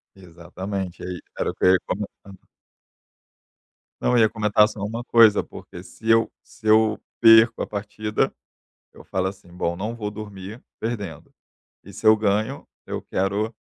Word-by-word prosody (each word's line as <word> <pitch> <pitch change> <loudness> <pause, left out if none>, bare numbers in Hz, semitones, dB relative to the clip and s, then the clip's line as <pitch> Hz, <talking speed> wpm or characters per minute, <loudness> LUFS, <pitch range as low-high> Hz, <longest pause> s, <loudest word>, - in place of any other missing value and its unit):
Exatamente, 90 +1 -7
aí 90 -1 -5 0.2
era - - 0
o - - -13
que - - -1
eu 90 - +7
ia 90 - +4
comentando. 100 -1 -7 1.5
Não, 125 - +1
eu 120 - +4
ia 110 -1 +5
comentar 105 -1 +3
só 105 - -10
uma 115 +4 -4
coisa, 115 -4 +5
porque 90 - -11
se 110 +5 -8
eu 115 0 +4
se 110 - -20
eu 110 0 +4 0.2
perco 115 0 +7
a - - -2
partida, 105 +1 -2 0.6
eu - - -14
falo 95 0 -2
assim: 95 -2 -11
"Bom, 85 -1 -2
não 110 +5 -4
vou 105 -2 -4
dormir 105 +1 -9 0.2
perdendo". 105 -9 -5 0.5
E 100 - -12
se 110 - -6
eu 110 - +9
ganho, 105 0 -1 0.2
eu - - -4
quero 100 +4 -1
105 Hz, 160 wpm, -23 LUFS, 95-110 Hz, 1.5 s, eu